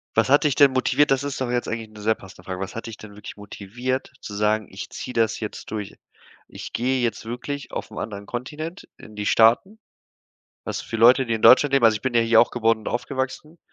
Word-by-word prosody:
Was - - +2
hat 145 +3 +5
dich 145 -3 +2
denn 140 -2 +6
motiviert? 135 +2 +2
Das 135 +1 +2
ist 145 -1 -4
doch 130 -2 -2
jetzt 120 0 -1
eigentlich 110 -1 -4
'ne 110 -1 -13
sehr 110 +1 +2
passende 95 - -15
Frage. 95 -1 -6
Was 95 - -6
hat 115 - -6
dich 110 - -8
denn 105 -1 -12
wirklich 105 0 -10
motiviert, 120 +6 -5
zu 105 - -8
sagen: 105 +1 0
„Ich 95 - -8
ziehe 125 - -7
das 115 -2 +1
jetzt 110 -2 -7
durch! 105 -2 -5 0.5
Ich - - -9
gehe 130 +2 0
jetzt 115 -2 -2
wirklich 125 +4 -6
auf - - -6
'n - - -7
anderen 100 -2 -6
Kontinent, 155 - -6
in 110 - -14
die 105 0 -3
Staaten“, 120 - +4 0.9
was - - -4
für 115 - -5
Leute, 125 +3 +6
die 115 - 0
in 110 - -4
Deutschland 140 +2 +6
leben 130 -4 +4
also, 110 -1 +6
ich - - -8
bin 130 -2 -2
ja 115 - +4
hier 115 0 +5
auch 120 - +3
geworden 115 -2 +1
und - - -5
aufgewachsen, 130 +5 -4
115 Hz, 235 wpm, -23 LUFS, 110-130 Hz, 0.9 s, denn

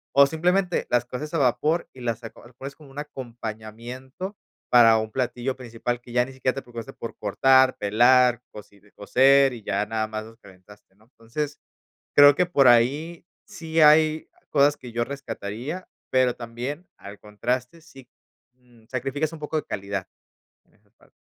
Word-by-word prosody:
o 140 0 +8
simplemente 175 +5 0
las 120 -1 +2
coces 145 +5 -7
a 165 - +1
vapor 150 +5 +1
y 130 - -14
las 115 -1 -3
aco 115 - -11
las 120 - -21
pones 135 +2 -8
como 150 -3 -16
un 135 - -16
acompañamiento 125 - -8 0.3
para 115 -2 +7
un 110 0 -4
platillo 130 0 -2
principal 120 -1 -4
que 120 0 -15
ya 120 0 +3
ni 135 - -11
siquiera 130 -1 -1
te 135 - -4
preocupaste 120 +2 -9
por 115 - -8
cortar, 130 +5 +4
pelar, 120 +3 +4
cocire 105 -1 -15
cocer 135 +5 +4
y, 115 -3 -10
ya 100 0 -1
nada 110 0 -2
más 110 0 -5
nos 115 0 -15
calentaste, 95 -1 -19
¿no? 105 +2 -26
Entonces, 130 +5 -6 0.6
creo 145 0 +9
que 180 +2 +1
por 140 -7 +4
ahí 140 +9 +3 0.2
sí 165 -6 -4
hay 155 0 +5 0.2
cosas 145 0 +3
que 125 - -11
yo 120 +1 -1
rescataría, 140 - -6 0.2
pero, 130 -1 +2
también 125 +8 -6
al 100 0 -11
contraste, 125 +8 -3
sí, 135 -6 -16 0.4
mm, 120 -3 -25
sacrificas 135 +4 -2
un 165 - -9
poco 150 +1 -5
de 155 - -2
calidad 100 -1 -4 0.6
en - - -34
esa - - -34
parte. - - -27
125 Hz, 170 wpm, -24 LUFS, 115-145 Hz, 0.6 s, creo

